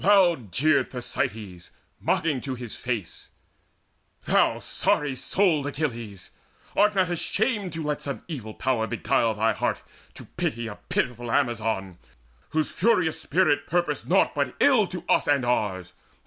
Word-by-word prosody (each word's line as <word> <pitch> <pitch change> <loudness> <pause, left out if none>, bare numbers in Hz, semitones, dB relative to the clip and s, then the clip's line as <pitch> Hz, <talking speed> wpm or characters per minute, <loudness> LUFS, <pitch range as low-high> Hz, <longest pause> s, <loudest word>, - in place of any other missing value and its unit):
Loud 175 - +4
jeered 150 - +3
Thersites, 105 -7 -4 0.3
mocking 150 -6 0
to 135 -2 -4
his 120 -3 -8
face: 120 -8 -4 0.9
"Thou - - +3
sorry 145 -3 0
souled 160 0 +1
Achilles! 120 - -4 0.4
art 210 0 +4
not 180 -2 +2
shamed 210 -5 0
To 165 -1 -4
let 150 -1 -2
some 140 -1 -5
evil 120 -10 -6
Power 120 -4 0
beguile 115 -1 +1
thine 110 +2 +2
heart - - -2 0.3
To - - -10
pity 115 +1 -3
of 105 - -7
a - - -33
pitiful 120 -1 -1
Amazon 110 -8 0 0.5
Whose 155 -1 0
furious 180 -5 +2
spirit 160 -2 +2
purposed 175 +1 -1
naught - - +4
but - - -1
ill 255 -8 +5
To 180 -2 -6
us - - +3
and 140 -3 +2
ours? 95 -7 -1
135 Hz, 145 wpm, -26 LUFS, 115-170 Hz, 0.9 s, ill